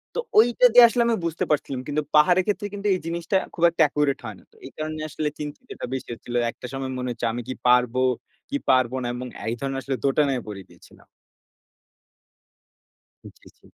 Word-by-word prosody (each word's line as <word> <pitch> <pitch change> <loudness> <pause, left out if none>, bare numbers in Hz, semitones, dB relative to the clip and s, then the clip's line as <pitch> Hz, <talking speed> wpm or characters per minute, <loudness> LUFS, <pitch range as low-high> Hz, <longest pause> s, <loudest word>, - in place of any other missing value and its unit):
তো - - -1 0.2
ঐটা 240 +3 +6
দিয়ে 245 0 +10
আসলে 240 +1 0
আমি 235 - +2
বুঝতে 165 -1 -2
পারছিলাম। 140 -3 -1
কিন্তু 150 +1 0
পাহাড়ের 175 +5 +5
ক্ষেত্রে 205 0 -1
কিন্তু 205 0 -3
এই 185 - -1
জিনিসটা 170 +3 -1 0.2
খুব 170 - -4
একটা 170 - -2
accurate 145 -1 0
হয় 110 -2 -6
না। - - -21
তো - - -27
এই 135 - -9
কারণে 155 0 -4
আসলে 150 0 -2
চিন্তিতটা 150 - -7
বেশি 130 - -4
হচ্ছিল। 120 +1 -9 0.2
একটা - - -12
সময় 135 -1 -4
মনে 125 0 -3
হচ্ছে, 120 0 -4
"আমি 120 - -4
কি 130 - -3
পারবো 125 0 +3 0.5
কি 285 - -1
পারবো 130 -1 +3
না?" - - -2
এবং 125 +1 -5 0.2
এই 115 - -1
ধরনের 135 0 -3
আসলে 135 0 -2
দোটানায় 135 -2 +2
পড়ে 100 -2 -7
গিয়েছিলাম। - - -19 2.2
উ - - -9
জি, - - -19
জি। - - -26
145 Hz, 195 wpm, -24 LUFS, 130-170 Hz, 2.2 s, দিয়ে